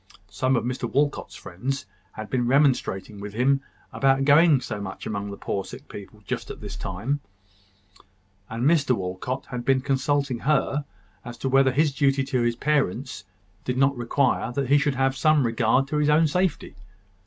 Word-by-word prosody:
Some 130 +6 +1
of 120 - 0
Mr 125 +2 -3
Walcot's 145 0 0
friends 135 +9 -5 0.3
had 110 0 -7
been 125 -2 0
remonstrating 125 -7 +1
with 100 0 -7
him 135 +4 +2 0.3
about 135 0 +2
going 150 0 +6
so 105 -4 -5
much 95 -1 -7
among 100 -1 -3
the 100 - -7
poor 100 - -3
sick 130 +7 -11
people, 105 +1 -11
just - - -4
at - - -7
this - - -7
time; 115 +11 -3 1.3
and 115 +3 -3
Mr 145 -5 +3
Walcot 95 +8 -4
had 125 -1 -5
been 130 +1 +2
consulting 140 -1 0
her 145 0 0 0.4
as 120 -1 -8
to 135 - -2
whether 135 0 +4
his 145 +2 +2
duty 135 -1 +2
to 130 -2 -1
his 120 0 +1
parents 130 -6 -1 0.4
did 125 0 -2
not 135 +1 +3
require 120 0 0
that 135 -1 -2
he 145 +1 +5
should 140 -2 0
have 135 0 +1
some 155 -2 +3
regard 115 +3 +2
to 150 - -1
his 150 0 +2
own 155 +2 +5
safety. 180 +1 -1
135 Hz, 175 wpm, -25 LUFS, 120-140 Hz, 1.3 s, going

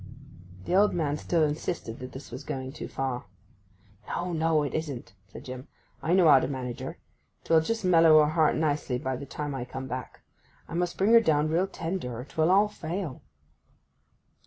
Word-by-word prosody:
The - - -2
old 205 +2 +4
man 150 -4 0
still 165 +1 +1
insisted 150 -5 -3
that 130 0 -7
this 135 -1 -10
was 130 +4 -7
going 130 -3 -5
too - - -6
far. 130 -3 -3 0.8
'No, 175 0 -3
no, 160 -1 +2
it 145 - -3
isn't,' 145 -10 -4
said 100 - -11
Jim. 130 0 -7 0.3
'I 165 - 0
know 180 -3 +5
how 135 - +8
to - - -1
manage 130 -3 -5
her. - - -6 0.5
'Twill 160 -1 +4
just 225 +5 -2
mellow 165 -3 +6
her 150 - +1
heart 160 -1 +3
nicely 145 -5 0
by 130 0 -2
the 140 +2 -7
time 145 +1 -4
I 135 -2 -3
come 130 +2 -6
back. 130 -1 -6 0.5
I - - -9
must 175 0 -1
bring 205 +4 +3
her 230 - +9
down 155 -6 +2
real 175 +4 +1
tender, 165 -10 -4
or 125 - -6
'twill 160 +3 0
all 200 +3 +5
fail. 170 -6 -5
155 Hz, 190 wpm, -28 LUFS, 130-170 Hz, 0.8 s, her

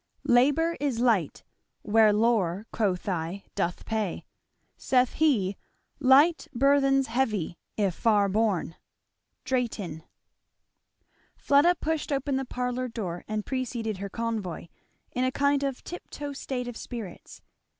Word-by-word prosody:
Labour 290 +7 +3
is 275 -5 -1
light, 220 - +1 0.4
where 215 0 +5
lore 210 -3 +1
(quoth 195 -5 0
I) 180 +1 -3
doth 175 +1 -2
pay; 215 -5 -2 0.5
(Saith 250 -1 +2
he) 220 -12 +2 0.4
light 285 +6 +5
burthens 275 +1 +4
heavy, 220 -9 -1 0.2
if 200 -4 +1
far 205 +1 +3
borne. 195 -5 0 0.7
Drayton. 220 -11 -2 1.4
Fleda 290 +5 +4
pushed 320 -2 -2
open 275 0 0
the 270 0 -1
parlour 250 0 -2
door 195 -8 -5
and 215 -1 -3
preceded 235 -5 -3
her 200 +1 -5
convoy, 215 -7 -4 0.4
in 250 - -1
a 255 - +1
kind 280 +1 +2
of 275 -2 -3
tip 355 - -8
toe 290 -1 -6
state 255 -2 -4
of 245 - -6
spirits. 220 -6 -8
235 Hz, 125 wpm, -27 LUFS, 200-270 Hz, 1.4 s, where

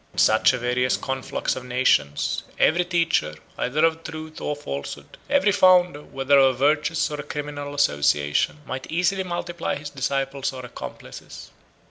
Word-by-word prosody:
In - - -20
such 110 0 +5
a 125 - -2
various 125 +1 0
conflux 135 -1 -3
of 130 - -6
nations, 125 - +1 0.2
every 175 +3 +3
teacher, 165 - 0 0.2
either 150 +6 +1
of 165 0 0
truth 155 -1 -8
or 150 - -2
falsehood, 70 - -7
every 280 -7 +3
founder, 180 -5 +4
whether 135 0 +2
of 135 -1 +4
a - - -14
virtuous 150 +4 +1
or 150 - -4
a - - -4
criminal 145 -1 -6
association, 75 - +1
might 130 -1 -6
easily 180 +3 +1
multiply 175 -1 -3
his 145 0 -7
disciples 135 0 -2
or 130 -1 -7
accomplices. 125 - -10
145 Hz, 155 wpm, -24 LUFS, 130-165 Hz, 0.2 s, such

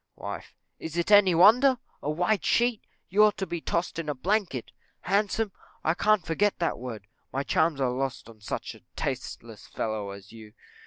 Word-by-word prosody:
Wife. - - -7 0.2
Is 160 +1 -6
it 170 +4 0
any 200 -4 +7
wonder? 245 +9 +6 0.2
A 145 - -3
white 180 +6 +1
sheet! 240 -2 +2 0.3
You 205 +3 +5
ought 210 -1 +4
to 195 - -2
be 170 -2 -4
tossed 170 0 -2
in 160 -2 -4
a 145 - -1
blanket. 175 - -1 0.3
Handsome! 205 +2 0 0.3
I 160 - +2
can't 210 0 +2
forget 200 +6 +1
that 170 -2 -1
word: 115 -5 -7 0.3
my 135 +1 -1
charms 160 0 +1
are 130 -2 +1
lost 130 -2 -3
on 110 -2 -15
such 105 - -4
a - - -16
tasteless - - -5
fellow 110 -2 -3
as 100 0 -10
you. 110 -2 -13
170 Hz, 180 wpm, -27 LUFS, 130-205 Hz, 0.3 s, any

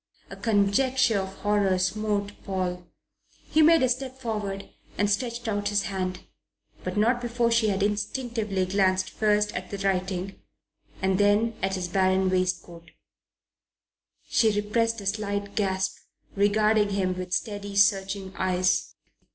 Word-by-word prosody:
A - - -6
conjecture 225 +2 +2
of 190 0 -5
horror 205 -2 +2
smote 205 +2 -1
Paul. 180 -2 -3 0.6
He 315 - +4
made 320 -1 +6
a 255 - +3
step 260 +1 -3
forward 210 -5 -4 0.3
and 205 - +2
stretched 235 +3 -2
out 205 -1 -1
his 205 -1 +1
hand; 185 -2 -3 0.6
but - - -4
not 235 +3 +2
before 235 -1 0
she 230 -1 +3
had 195 -1 0
instinctively 210 -1 -1
glanced 185 0 +1
first 210 -1 +1
at 185 - -5
the 200 - -5
writing 190 -1 -2 0.6
and 190 0 +2
then 205 +3 +3
at 190 0 0
his 180 -1 -3
barren 190 +1 +2
waistcoat. 180 -2 -2 1.4
She 220 -2 +3
repressed 230 +2 0
a - - -9
slight 200 0 -2
gasp, 190 -2 -1 0.4
regarding 210 +1 +3
him 190 -2 0
with 185 0 -6
steady, 205 +1 -3
searching 195 -1 +2
eyes. 185 0 +1
200 Hz, 135 wpm, -26 LUFS, 190-215 Hz, 1.4 s, made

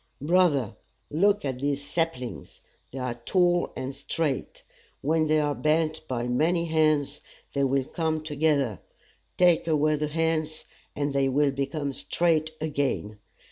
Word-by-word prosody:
"Brother, 150 - +2 0.3
look 200 +4 +2
at 130 -2 -3
these 140 +1 -1
saplings! 165 -8 -3 0.3
They 135 - -8
are 125 -2 -2
tall 175 +2 +2
and 130 +1 -5
straight. 145 -2 -3 0.4
When 155 +2 +2
they 155 0 +3
are 145 -1 +1
bent 155 +1 0
by 120 -2 -2
many 165 +7 +1
hands, 155 -3 +1 0.3
they 140 - +1
will 135 0 +1
come 160 0 -2
together. 145 - +1 0.6
Take 175 -2 +4
away 155 -1 +2
the 150 +1 -1
hands, 155 0 -1 0.3
and 145 -1 -1
they 135 -1 +2
will 140 +1 +2
become 140 +1 -2
straight 160 +2 +1
again. 140 -9 -2
150 Hz, 140 wpm, -26 LUFS, 140-160 Hz, 0.6 s, Take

